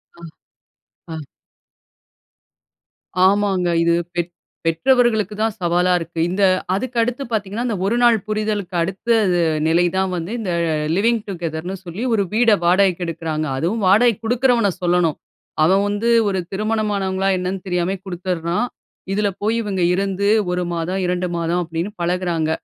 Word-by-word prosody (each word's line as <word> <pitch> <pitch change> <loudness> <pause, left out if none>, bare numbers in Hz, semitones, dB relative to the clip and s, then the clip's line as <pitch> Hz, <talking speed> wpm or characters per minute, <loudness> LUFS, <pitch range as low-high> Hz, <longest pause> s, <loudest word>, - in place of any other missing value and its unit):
ஆ, - - -18 0.9
ஆ. - - -4 2.1
ஆமாங்க, 195 -3 +1 0.2
இது 170 0 +3 0.2
பெத் 175 0 -2 0.3
பெற்றவர்களுக்கு 220 +4 +2
தான் 220 -1 +1
சவாலா 175 +1 +2
இருக்கு. 165 0 -6
இந்த 195 +2 0 0.3
அதுக்கடுத்து 245 +3 -1
பாத்தீங்கன்னா, 210 +2 -2
இந்த 220 - -1
1 235 +4 +1
நாள் 235 -2 +5
புரிதலுக்கு 210 -4 -2
அடுத்த 190 +7 -3 0.2
து 175 - +2 0.3
நிலை 170 +2 +3
தான் 190 0 +1
வந்து, 170 +4 -4
இந்த 190 -5 -3 0.2
ல - - +1 0.2
"லிவிங் 230 +2 +2
டுகெதர்ன்னு" 175 0 -4
சொல்லி 180 +8 -5
ஒரு 200 -3 +2
வீட 230 +1 +4 0.2
வாடகைக்கு 185 0 +3
எடுக்கிறாங்க. 160 -2 -3
அதுவும் 195 +9 -1
வாடகைக்கு 225 +3 +4
குடுக்கிறவன 240 -3 +2
சொல்லணும். 175 -3 +2 0.5
அவன் 195 +4 +3
வந்து 205 +3 -1 0.2
ஒரு 190 -1 -1
திருமணமானவங்களா 200 -2 -1
என்னன்னு 185 +1 -4
தெரியாமயே 180 +2 -1
குடுத்துடுறான். 180 +3 -2 0.5
இதில 205 0 +1
போயி 220 +2 +1
இவுங்க 195 -3 -2
இருந்து, 195 +1 0 0.2
1 180 0 -1
மாதம், 180 +3 -2
2 180 0 -1
மாதம் 170 +1 0
அப்படின்னு 165 +5 -4
பழகுறாங்க. 170 -2 0
190 Hz, 135 wpm, -20 LUFS, 175-215 Hz, 2.1 s, நாள்